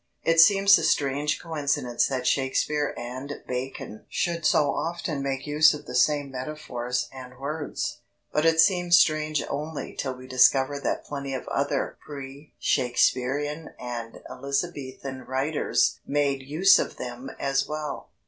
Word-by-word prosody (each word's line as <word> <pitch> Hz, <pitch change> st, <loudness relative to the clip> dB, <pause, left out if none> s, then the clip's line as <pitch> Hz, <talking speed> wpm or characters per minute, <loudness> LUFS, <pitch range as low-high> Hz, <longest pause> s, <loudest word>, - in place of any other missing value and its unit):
It 165 Hz, 0 st, +3 dB
seems 200 Hz, +3 st, +7 dB
a -, -, -3 dB
strange 145 Hz, +1 st, +1 dB
coincidence 140 Hz, -7 st, 0 dB
that 130 Hz, -2 st, -3 dB
Shakespeare 145 Hz, +3 st, 0 dB
and 130 Hz, +4 st, -6 dB, 0.2 s
Bacon 125 Hz, -4 st, -5 dB
should 170 Hz, -2 st, 0 dB
so 145 Hz, -2 st, +3 dB
often 165 Hz, -3 st, -3 dB
make 135 Hz, -1 st, -3 dB
use 150 Hz, +1 st, +5 dB
of 150 Hz, -, -10 dB
the -, -, -8 dB
same 145 Hz, -2 st, +2 dB
metaphors 125 Hz, -3 st, -3 dB
and 130 Hz, -1 st, -10 dB
words. 145 Hz, +3 st, -4 dB, 0.3 s
But 150 Hz, -, +2 dB
it 165 Hz, 0 st, +3 dB
seems 175 Hz, -1 st, +5 dB
strange 155 Hz, -1 st, +2 dB
only 150 Hz, +2 st, -5 dB
till 130 Hz, -2 st, -3 dB
we 130 Hz, 0 st, -12 dB
discover 130 Hz, +2 st, +3 dB
that -, -, -2 dB
plenty 140 Hz, -2 st, -4 dB
of 130 Hz, -, -6 dB
other 140 Hz, +1 st, -1 dB
pre 140 Hz, 0 st, -9 dB
Shakespearean 135 Hz, +5 st, 0 dB
and 120 Hz, -2 st, -6 dB
Elizabethan 140 Hz, -1 st, -4 dB
writers 135 Hz, +4 st, 0 dB
made 140 Hz, -2 st, +1 dB
use 155 Hz, +9 st, +5 dB
of -, -, -3 dB
them 125 Hz, +2 st, -6 dB
as 135 Hz, 0 st, 0 dB
well. 150 Hz, -2 st, -5 dB
140 Hz, 140 wpm, -26 LUFS, 130-155 Hz, 0.3 s, seems